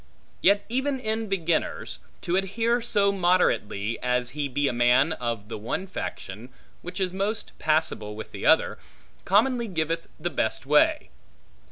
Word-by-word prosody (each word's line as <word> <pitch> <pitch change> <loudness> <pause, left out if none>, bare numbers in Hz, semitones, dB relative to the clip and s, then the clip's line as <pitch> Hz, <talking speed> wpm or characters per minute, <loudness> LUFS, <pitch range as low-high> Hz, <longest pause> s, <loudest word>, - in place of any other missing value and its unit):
Yet 200 +1 +4
even 265 +3 -1
in 220 -1 -2
beginners, 170 -4 -1 0.2
to 175 - 0
adhere 225 +5 +1
so 205 -4 +2
moderately, 175 - +1
as 125 0 0
he 145 0 -2
be 140 +2 0
a - - 0
man 125 +6 +4
of 115 -6 -4
the 115 - -6
one 115 - -3
faction, 120 - -6 0.3
which 180 +3 -7
is 185 -1 0
most 205 +3 -2
passable 155 -9 0
with 110 - -8
the - - -8
other, - - +4 0.5
commonly 235 +4 +3
giveth 165 -3 -2
best 145 -9 -1
way. 150 - +3
170 Hz, 145 wpm, -26 LUFS, 125-205 Hz, 0.5 s, Yet